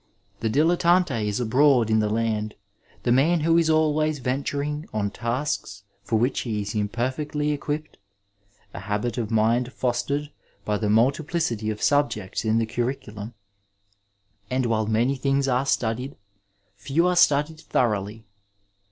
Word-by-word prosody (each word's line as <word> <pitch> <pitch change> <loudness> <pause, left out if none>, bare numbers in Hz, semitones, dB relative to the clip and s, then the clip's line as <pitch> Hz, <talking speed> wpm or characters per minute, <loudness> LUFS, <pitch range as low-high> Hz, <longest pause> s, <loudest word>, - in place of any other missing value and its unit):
The 110 - -1
dilettante 170 -3 +2
is 105 +2 -1
abroad 125 -1 +3
in 110 - +4
the 105 -1 +1
land, 110 -1 -1 0.5
the 120 - +1
man 155 +7 +3
who 165 +2 +3
is 165 -1 +1
always 155 -1 +2
venturing 140 +3 -2
on 100 -2 -1
tasks 115 -4 -3 0.2
for 105 +3 -2
which 120 +5 +1
he 105 -4 -2
is 100 +2 -5
imperfectly 130 +8 -1
equipped, 150 +1 -4 0.8
a - - -6
habit 105 +5 -2
of 110 -3 -2
mind 115 +3 +2
fostered 135 +4 -2 0.3
by 105 -1 0
the 105 - -1
multiplicity 120 0 +1
of 105 -1 -4
subjects 145 -10 +1
in 110 0 +2
the 115 - +2
curriculum; 115 -2 -4 1.1
and 130 0 0
while 110 -2 0
many 115 +5 +1
things 135 +1 0
are 130 +1 +1
studied, 125 +3 -1 0.6
few 135 - 0
are 180 0 +2
studied 150 -1 +3
thoroughly. 110 -6 -1
125 Hz, 140 wpm, -24 LUFS, 110-145 Hz, 1.1 s, in